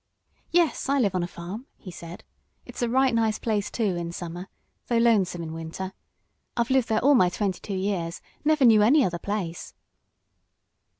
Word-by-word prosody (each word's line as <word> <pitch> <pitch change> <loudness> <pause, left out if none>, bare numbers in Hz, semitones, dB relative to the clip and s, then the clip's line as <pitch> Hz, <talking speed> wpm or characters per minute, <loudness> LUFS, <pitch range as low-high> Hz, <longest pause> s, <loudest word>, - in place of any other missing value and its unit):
"Yes, 335 -4 +1
I 280 - +3
live 210 -8 +2
on 185 - 0
a 175 - -2
farm," 185 +10 -8
he 185 - -10
said. 170 0 -10 0.4
"It's - - -8
a 240 - +1
right 260 +1 +3
nice 225 -2 +1
place, 210 -3 -1
too, 210 -6 -1
in 170 -1 -4
summer, 175 +1 -6 0.4
though 235 - +1
lonesome 200 -7 +2
in 160 -1 -6
winter. 165 +4 -6 0.6
I've 235 +1 0
lived 260 -3 +2
there 220 -1 +2
all 285 +2 +6
my 185 -9 +5
twenty 190 0 -2
two 200 - -5
years 185 -3 -2 0.2
never 305 -2 +3
knew 220 -3 +7
any 260 +7 +5
other 175 -1 -2
place." 190 -5 -4
205 Hz, 180 wpm, -26 LUFS, 175-235 Hz, 0.6 s, knew